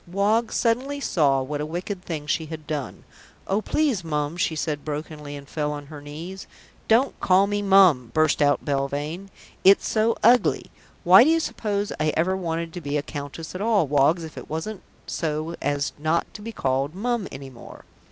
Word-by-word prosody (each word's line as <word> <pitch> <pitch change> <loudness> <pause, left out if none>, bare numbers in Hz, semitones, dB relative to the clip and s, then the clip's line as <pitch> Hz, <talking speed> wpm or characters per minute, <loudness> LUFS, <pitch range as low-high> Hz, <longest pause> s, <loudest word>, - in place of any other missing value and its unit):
Woggs 210 +5 +1
suddenly 255 +5 0
saw 140 - +2
what 145 +2 -4
a - - -2
wicked 180 +4 -4
thing 155 -5 -5
she 155 +1 -1
had 155 -1 -8
done. 145 -4 -5 0.4
"Oh, 200 +3 0
please, 270 - 0
Mum," 150 -1 -2
she 170 -2 0
said 150 -1 -3
brokenly 150 -1 -6
and 140 -1 -10
fell 150 0 -2
on 145 -1 -6
her 145 0 -10
knees. 165 +7 -8 0.4
"Don't 240 +5 +3
call 190 +1 +4
me 205 0 -1
'Mum,'" 190 - +5
burst 155 +1 +2
out 145 0 +2
Belvane. 145 +6 -2 0.3
"It's 195 +1 +6
so 225 +1 +1
ugly. 240 +2 +4 0.3
Why 190 +4 +8
do 290 - +3
you 330 0 +4
suppose 205 -9 -2
I 155 0 +2
ever 180 +4 +2
wanted 165 -2 -3
to 175 - -6
be 145 -1 -2
a 145 - -2
countess 145 +2 -7
at 185 - -5
all, 210 -5 +3
Woggs, 145 +4 +2
if 160 - -8
it - - -12
wasn't 185 +6 -4 0.2
so 155 0 -3
as 145 -1 -1
not 160 +2 0
to 210 - -9
be 225 +2 -6
called 135 -3 -1
'Mum' 235 0 -1
any 135 0 -8
more?" 120 - -13
165 Hz, 190 wpm, -24 LUFS, 145-200 Hz, 0.4 s, Why